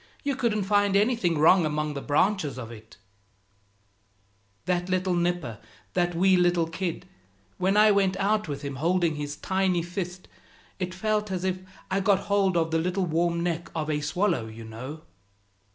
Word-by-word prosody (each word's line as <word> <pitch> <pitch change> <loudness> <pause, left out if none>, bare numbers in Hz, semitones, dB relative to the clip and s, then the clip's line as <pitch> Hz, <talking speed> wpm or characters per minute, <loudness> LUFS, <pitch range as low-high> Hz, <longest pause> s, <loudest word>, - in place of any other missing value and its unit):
You 285 -2 0
couldn't 225 -5 0
find 205 0 +2
anything 205 -6 +2
wrong 170 +4 +6
among 150 0 -1
the 140 - -5
branches 155 0 +1
of 120 -2 -7
it 110 -1 -13 0.8
" 100 0 -41
"That 180 0 -1
little 185 0 +1
nipper, 175 -10 -1 0.3
that 175 -1 0
wee 185 +2 +4
little 175 -1 +3
kid, 175 +1 -4 0.5
when 195 +3 +2
I 215 0 +7
went 195 -2 +2
out 210 +1 +1
with 145 -1 -5
him, 140 -2 -5
holding 170 +2 +1
his 145 0 -4
tiny 190 +1 0
fist, 180 +1 -5 0.5
it 185 -1 -3
felt 210 +2 0
as 185 -1 -3
if 185 0 -1 0.3
I'd 195 +1 +1
got 195 -1 +3
hold 200 -3 +1
of 165 -1 +1
the 165 - +2
little 180 +3 0
warm 170 +1 0
neck 170 -1 -2
of 155 -1 -1
a 150 0 -1
swallow, 160 - 0
you 110 +1 -10
know." 125 +8 -8
175 Hz, 170 wpm, -26 LUFS, 150-190 Hz, 0.8 s, I